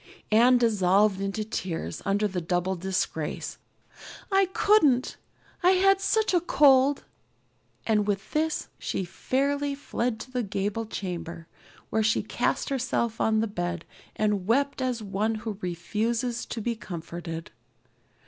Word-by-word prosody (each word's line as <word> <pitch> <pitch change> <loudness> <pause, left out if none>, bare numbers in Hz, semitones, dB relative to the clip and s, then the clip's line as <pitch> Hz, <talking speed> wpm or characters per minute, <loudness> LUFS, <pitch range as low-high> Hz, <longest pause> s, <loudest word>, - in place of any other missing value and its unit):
Anne 240 +4 +6
dissolved 205 -3 +3
into 195 +2 -2
tears 170 - -4
under 205 +2 +2
this 185 -3 -3
double 180 +2 0
disgrace. 185 -4 -3 0.7
"I 390 0 +4
couldn't 300 - +3 0.5
I 365 +1 +5
had 390 +1 +4
such 435 +1 +1
a 350 - +4
cold!" 280 -4 +4 0.8
and 210 -2 +2
with 200 0 -2
this 315 +1 0
she 190 - -2
fairly 280 +9 -1
fled 245 -5 -2
to 255 - -10
the 250 -1 -1
gable 205 +1 -2
chamber, 170 -5 -5 0.4
where 220 - +2
she 220 +1 +2
cast - - -1
herself 240 -3 -1
on 220 0 +3
the 225 - 0
bed 175 -3 -3 0.3
and 210 -3 0
wept 275 +4 +1
as 250 -3 -1
one 210 +3 -1
who 215 -2 -5
refuses 225 +7 -2
to 230 - -4
be 235 +2 -1
comforted. 170 -4 -7
220 Hz, 135 wpm, -27 LUFS, 190-255 Hz, 0.8 s, Anne